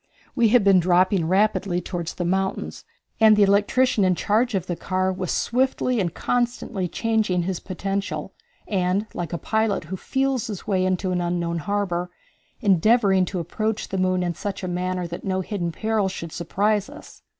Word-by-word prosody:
We 235 -3 +4
had 230 0 +4
been 195 -2 +6
dropping 180 0 +3
rapidly 195 -1 +1
toward 175 -1 -5
the 175 - -3
mountains, 190 +2 -2 0.3
and 220 -1 +7
the 210 - +6
electrician 205 +4 +3
in 185 -1 +3
charge 220 +5 +1
of 185 -2 -1
the 175 - -3
car 185 +2 -1
was 185 -1 -3
swiftly 255 -1 0
and 175 -4 0
constantly 240 -5 -1
changing 215 -2 0
his 185 0 -2
potential, 195 +1 -4 0.3
and, 190 +1 0
like 170 -2 -4
a 170 - -2
pilot 220 0 0
who 170 +5 -5
feels 265 +2 -1
his 205 -4 -6
way 190 -3 +1
into 185 0 -1
an 180 -1 0
unknown 170 -1 -1
harbor, 180 -1 -2 0.5
endeavoring 200 -1 +4
to 185 - -5
approach 215 +6 -2
the 195 - -2
moon 185 0 +1
in 175 -1 -1
such 200 +3 -5
a - - -2
manner 180 0 -2
that 170 0 -7
no 190 -1 -1
hidden 180 -3 -3
peril 215 +2 0
should 170 -3 -6
surprise 205 - 0
us. 300 +2 -13
190 Hz, 175 wpm, -23 LUFS, 180-215 Hz, 0.5 s, and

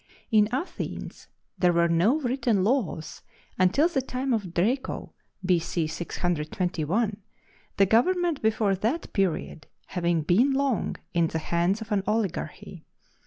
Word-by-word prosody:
In 210 -1 +5
Athens 270 +9 -5 0.3
there 180 -1 +4
were 170 0 +3
no 180 - +3
written 245 -6 +1
laws 205 - -1 0.4
until 190 - +4
the 320 -7 0
time 255 0 -2
of 205 -6 -2
Draco, 225 +11 -1 0.3
B.C. 170 -2 +1
621, 175 +5 -1 0.6
the 195 - +6
government 335 - +2
before 215 -2 +2
that 225 - -2
period 180 -5 -1 0.2
having 170 -3 0
been 230 - +3
long 270 -5 0 0.2
in 170 -2 +3
the 160 - -3
hands 170 +6 0
of 220 - -8
an 205 -2 +2
oligarchy. 210 -3 -3
200 Hz, 125 wpm, -26 LUFS, 175-245 Hz, 0.6 s, the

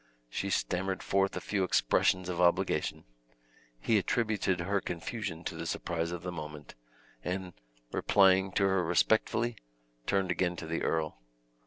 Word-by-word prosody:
She - - -2
stammered 95 +1 -1
forth 95 0 +1
a - - -1
few 100 -2 -1
expressions 90 +2 +2
of 90 -1 -2
obligation; 85 -1 +2 0.8
he 110 - +3
attributed 105 -3 0
her 100 +3 0
confusion 85 0 -4
to - - -4
the - - -5
surprise 85 -1 -2
of 85 0 -5
the 90 - -3
moment, 75 -3 -8 0.5
and, 90 0 -3 0.4
replying 95 -1 +4
to - - +2
her 95 -2 +3
respectfully, 110 +6 +2 0.5
turned 95 -2 +1
again 90 -1 0
to 80 - -6
the 85 +1 -2
earl. 80 -6 -1
90 Hz, 145 wpm, -31 LUFS, 85-95 Hz, 0.8 s, replying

